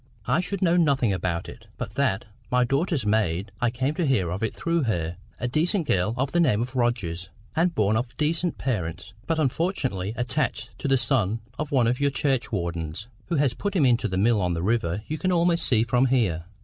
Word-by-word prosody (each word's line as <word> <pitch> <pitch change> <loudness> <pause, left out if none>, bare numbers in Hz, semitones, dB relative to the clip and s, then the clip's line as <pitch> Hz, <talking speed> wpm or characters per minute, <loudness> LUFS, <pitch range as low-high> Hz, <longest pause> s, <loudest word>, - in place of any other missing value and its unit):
I - - +2
should 190 +1 -2
know 175 0 +4
nothing 140 - +3
about 90 -2 -2
it, - - -11
but - - -5
that, 130 -8 0 0.2
my 125 0 +3
daughter's 140 - 0
maid—I 105 +2 0
came 130 +4 -1
to 170 +1 -1
hear 95 -11 +1
of 95 - -3
it 115 - 0
through 170 0 -1
her—a 90 +3 -3
decent 165 +7 +1
girl 95 +2 +1
of 130 +2 0
the 175 - +2
name 130 -11 +3
of 125 +3 -3
Rogers, 100 -9 -1 0.3
and 170 +1 +2
born 105 -3 +2
of 120 +2 -2
decent 165 +3 0
parents, 90 -7 -3
but 165 - +1
unfortunately 130 - -1
attached 125 +5 -2
to 145 - -2
the 135 -1 +4
son 115 -3 +1 0.2
of 150 0 -3
one 130 -4 +3
of 120 +2 +1
your 140 0 +3
churchwardens, 100 - -2 0.2
who 170 - -1
has 140 -4 +2
put 205 - -3
him 155 -7 +4
into 120 -2 +3
that 95 -2 -3
mill 110 +2 +3
on 90 -1 0
the 85 - -3
river 105 -2 0
you 155 0 -3
can 185 - +1
almost 170 -1 +3
see 115 -4 +3
from 125 +2 +2
here." 100 -11 +1
120 Hz, 205 wpm, -25 LUFS, 100-150 Hz, 0.3 s, know